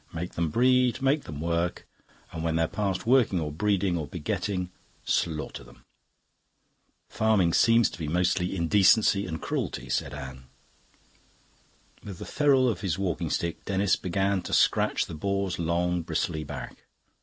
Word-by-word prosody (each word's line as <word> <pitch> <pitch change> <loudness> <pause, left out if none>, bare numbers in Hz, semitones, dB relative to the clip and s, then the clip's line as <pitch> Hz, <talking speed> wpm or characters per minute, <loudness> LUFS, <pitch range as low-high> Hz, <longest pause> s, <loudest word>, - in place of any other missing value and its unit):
Make 85 +2 -5
them 85 -1 -1
breed, 125 +6 +3
make 140 +2 +1
them 75 -2 -7
work, 85 +2 -2 0.4
and 80 - -5
when 80 -1 0
they're 80 0 +2
past 100 0 -2
working 120 -7 +3
or 75 -2 -3
breeding 95 +2 0
or 75 - -4
begetting, 90 +6 -3 0.3
slaughter 80 -6 -2
them." - - -18 1.2
"Farming 105 -6 +2
seems 115 0 +5
to - - -10
be 80 - -3
mostly 90 +3 0
indecency 100 +3 +3
and 80 -2 -4
cruelty," 65 -3 -4
said - - -1
Anne. 65 -2 -8 1.6
With 100 -4 -8
the - - -8
ferrule 140 -3 +3
of 115 - -1
his 95 -4 -1
walking 95 -5 -2
stick 85 -1 -2
Denis 100 0 +2
began 95 +1 -1
to - - -7
scratch - - +2
the - - -9
boar's 100 +2 -2
long 85 +1 0
bristly 80 -1 -2
back. 70 - -8
90 Hz, 150 wpm, -27 LUFS, 80-100 Hz, 1.6 s, seems